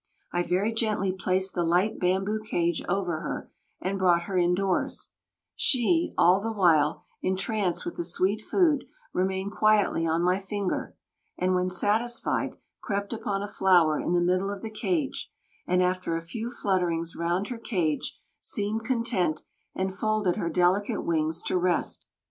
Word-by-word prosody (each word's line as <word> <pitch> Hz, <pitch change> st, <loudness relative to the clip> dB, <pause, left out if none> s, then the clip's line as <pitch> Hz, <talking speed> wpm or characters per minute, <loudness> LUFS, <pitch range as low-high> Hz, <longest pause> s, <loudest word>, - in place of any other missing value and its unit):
I 175 Hz, -, +2 dB
very 185 Hz, +6 st, 0 dB
gently 215 Hz, -4 st, +1 dB
placed 190 Hz, +1 st, 0 dB
the 175 Hz, -, 0 dB
light 180 Hz, +5 st, +1 dB
bamboo 190 Hz, +4 st, 0 dB
cage 170 Hz, -5 st, 0 dB
over 180 Hz, -4 st, 0 dB
her -, -, -5 dB, 0.3 s
and 195 Hz, +1 st, -2 dB
brought 175 Hz, -2 st, +4 dB
her 195 Hz, +1 st, -5 dB
indoors; 180 Hz, +2 st, 0 dB, 0.4 s
she, 330 Hz, +3 st, +2 dB
all 180 Hz, +3 st, +5 dB
the 225 Hz, +2 st, -2 dB
while, 165 Hz, -7 st, +3 dB, 0.2 s
entranced 190 Hz, -2 st, -1 dB
with 170 Hz, -, -5 dB
the 175 Hz, -, -1 dB
sweet 185 Hz, +5 st, +1 dB
food, 310 Hz, -, +2 dB, 0.3 s
remained 190 Hz, +2 st, -1 dB
quietly 210 Hz, -6 st, +3 dB
on 165 Hz, +1 st, +1 dB
my 180 Hz, +2 st, +2 dB
finger, 200 Hz, -1 st, -3 dB, 0.4 s
and 185 Hz, 0 st, +1 dB
when 180 Hz, 0 st, +1 dB
satisfied, 215 Hz, +6 st, 0 dB, 0.3 s
crept 200 Hz, +1 st, -2 dB
upon 200 Hz, -3 st, -2 dB
a -, -, -3 dB
flower 175 Hz, -6 st, +3 dB
in 175 Hz, -, -1 dB
the 175 Hz, -, +3 dB
middle 185 Hz, +3 st, +1 dB
of 200 Hz, -1 st, -6 dB
the 220 Hz, -, -5 dB
cage, 290 Hz, +6 st, -2 dB, 0.4 s
and 180 Hz, 0 st, +3 dB
after 180 Hz, -2 st, 0 dB
a -, -, -4 dB
few 225 Hz, +7 st, -5 dB
flutterings 175 Hz, -7 st, -1 dB
round 175 Hz, +4 st, -1 dB
her 245 Hz, -2 st, -5 dB
cage 175 Hz, -10 st, -1 dB, 0.2 s
seemed 210 Hz, +2 st, -2 dB
content 225 Hz, -10 st, 0 dB, 0.3 s
and 190 Hz, 0 st, -1 dB
folded 215 Hz, -3 st, 0 dB
her 170 Hz, -, -2 dB
delicate 180 Hz, +4 st, +1 dB
wings 160 Hz, 0 st, 0 dB
to 180 Hz, -, 0 dB
rest. 180 Hz, -1 st, 0 dB
190 Hz, 155 wpm, -27 LUFS, 175-210 Hz, 0.4 s, all